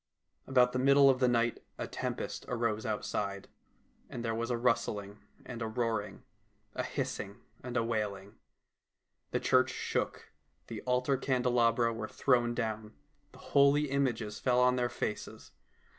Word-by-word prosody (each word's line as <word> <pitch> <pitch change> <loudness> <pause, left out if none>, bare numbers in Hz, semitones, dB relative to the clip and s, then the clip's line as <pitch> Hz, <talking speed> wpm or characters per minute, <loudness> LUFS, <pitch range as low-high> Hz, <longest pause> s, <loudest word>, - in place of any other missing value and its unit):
About 125 -2 +4
the 130 - 0
middle 140 +1 +6
of 130 - -2
the 130 - +4
night 120 -1 +1 0.2
a - - -3
tempest - - -4
arose 115 -3 -1
outside, 100 -2 -3 0.6
and 120 -1 -5
there 115 - 0
was 115 +1 -2
a 120 - 0
rustling 105 -4 -1 0.3
and 120 -2 -7
a 115 - -1
roaring, 110 -2 -2 0.5
a - - -2
hissing 125 -6 -4 0.3
and 125 0 -3
a - - +3
waiHng. 105 -3 -3 1.0
The - - 0
church - - +3
shook, - - -3 0.3
the 115 -3 -7
altar 125 +2 +2
candelabra 120 -3 +2
were 110 -1 -4
thrown 120 -2 +2
down, 110 -2 -3 0.4
the - - -16 0.2
holy 140 +1 +5
images 120 -6 -1
fell 125 -1 +2
on 125 0 +4
their 125 -1 0
faces. - - -5
120 Hz, 145 wpm, -32 LUFS, 110-125 Hz, 1.0 s, middle